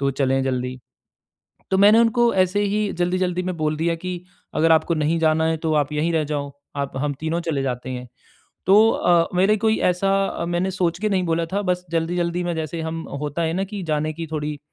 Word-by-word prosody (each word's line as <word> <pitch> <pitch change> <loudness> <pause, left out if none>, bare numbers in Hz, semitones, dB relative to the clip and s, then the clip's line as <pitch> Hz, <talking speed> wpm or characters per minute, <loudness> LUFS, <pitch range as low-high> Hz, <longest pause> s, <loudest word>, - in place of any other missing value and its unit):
तो 140 0 +1
चलें 135 0 +1
जल्दी। 125 -1 -2 0.9
तो 190 - +2
मैंने 205 +3 +7
उनको 235 +1 +3
ऐसे 190 +2 +2
ही 205 0 0
जल्दी-जल्दी 180 0 0
में 185 -1 -3
बोल 155 -1 -1
दिया 165 +2 0
कि 180 +1 -5 0.3
अगर 165 +1 +4
आपको 160 +1 +3
नहीं 155 +1 +1
जाना 160 0 +3
है 160 0 +1
तो 160 0 -1
आप 145 -1 +1
यहीं 155 +3 0
रह 155 -1 +2
जाओ, 145 -1 -3 0.2
आप 140 -1 -3
हम 145 +1 -1
तीनों 160 +2 -1
चले 160 -5 -2
जाते 125 -1 -3
हैं। 125 -1 -6 0.6
तो 210 +4 +6
अ, 175 -5 +3
मेरे 195 +4 +4
कोई 220 +1 +2
ऐसा 195 0 0
मैंने 175 +2 0
सोच 175 -2 0
के 215 - +1
नहीं 190 -2 +1
बोला 165 0 0
था, 205 - +1
बस 180 -1 -1
जल्दी-जल्दी 170 +1 -1
में 175 -1 -1
जैसे 160 +1 -4
हम 160 +1 -4 0.2
होता 150 +3 -2
है 160 0 0
ना 190 +2 0
कि 200 0 -6
जाने 155 +1 0
की 165 +1 -6
थोड़ी 150 -1 -3
170 Hz, 210 wpm, -22 LUFS, 150-185 Hz, 0.9 s, मैंने